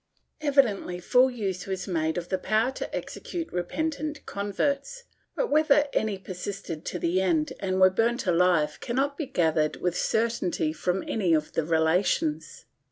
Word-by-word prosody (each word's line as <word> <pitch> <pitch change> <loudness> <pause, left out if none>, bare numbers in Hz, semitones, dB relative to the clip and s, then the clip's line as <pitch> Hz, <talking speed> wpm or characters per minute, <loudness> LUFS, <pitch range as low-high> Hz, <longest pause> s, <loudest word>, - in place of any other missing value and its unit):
Evidently 255 -11 +2
full 250 +8 +4
use 200 -7 -4
was 190 -1 -3
made 160 -3 -1
of 175 0 -4
the 190 - 0
power 220 +6 +1
to - - -5
execute 335 -2 -5
repentant 300 - -3
converts, 280 - -2 0.3
but - - -1
whether 300 -1 +4
any 215 -2 0
persisted 185 -3 -6
to - - -4
the 175 +2 +1
end 165 -5 +1
and 190 -1 -1
were 185 0 +7
burnt 230 +5 +1
alive 175 -4 +2
cannot 275 +4 -1
be 305 -2 -4
gathered 160 - +1
with 180 -1 -2
certainty 220 -9 0
from 180 +3 -1
any 185 -7 +2
of 155 -1 -2
the 165 - 0
relations. 170 - 0
190 Hz, 155 wpm, -27 LUFS, 175-260 Hz, 0.3 s, were